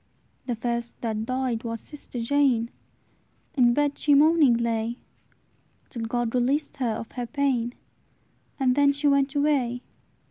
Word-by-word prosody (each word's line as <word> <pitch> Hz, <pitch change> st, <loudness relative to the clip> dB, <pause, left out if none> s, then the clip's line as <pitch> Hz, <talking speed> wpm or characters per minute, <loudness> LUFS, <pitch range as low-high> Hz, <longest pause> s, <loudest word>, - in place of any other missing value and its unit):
"The 245 Hz, -, -1 dB
first 235 Hz, +1 st, -3 dB
that 220 Hz, -1 st, -3 dB
died 255 Hz, -3 st, -1 dB
was 230 Hz, -1 st, -4 dB
sister 280 Hz, -3 st, -6 dB
Jane; 245 Hz, -2 st, +2 dB, 0.8 s
In 240 Hz, -5 st, +4 dB
bed 290 Hz, -1 st, 0 dB
she 290 Hz, -1 st, +4 dB
moaning 300 Hz, -3 st, +5 dB
lay, 230 Hz, 0 st, -1 dB, 0.9 s
Till 230 Hz, -3 st, -5 dB
God 240 Hz, 0 st, -1 dB
released 275 Hz, +5 st, 0 dB
her 245 Hz, -4 st, 0 dB
of 230 Hz, +1 st, -7 dB
her 245 Hz, -1 st, -5 dB
pain; 255 Hz, -4 st, 0 dB, 0.9 s
And 260 Hz, -2 st, +3 dB
then 285 Hz, +1 st, +4 dB
she 285 Hz, +1 st, 0 dB
went 280 Hz, 0 st, +2 dB
away. 270 Hz, -4 st, +1 dB
250 Hz, 140 wpm, -25 LUFS, 235-280 Hz, 0.9 s, moaning